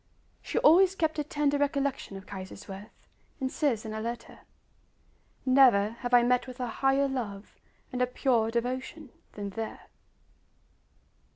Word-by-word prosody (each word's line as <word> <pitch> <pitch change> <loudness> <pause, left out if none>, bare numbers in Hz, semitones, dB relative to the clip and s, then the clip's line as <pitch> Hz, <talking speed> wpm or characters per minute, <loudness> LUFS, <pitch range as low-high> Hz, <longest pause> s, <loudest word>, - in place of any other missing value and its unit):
She - - -4
always 370 +5 +6
kept 315 -4 0
a - - +1
tender 290 -2 0
recollection 280 -7 -1
of 195 - -11
Kaiserswerth, 195 +1 -9 0.3
and 260 -1 -2
says 245 -8 0
in 215 - -5
a 220 - -4
letter: 235 +1 -6 1.1
"Never 255 -6 +5
have 245 -1 -4
I 245 -1 +6
met 250 +1 +2
with 255 0 -9
a 250 - -1
higher 270 +4 +1
love 220 -7 -5 0.4
and 250 - -2
a 250 - +3
purer 245 -3 +1
devotion 255 +4 -3 0.2
than 205 -1 -5
there." 220 +3 -5
250 Hz, 145 wpm, -29 LUFS, 220-280 Hz, 1.1 s, always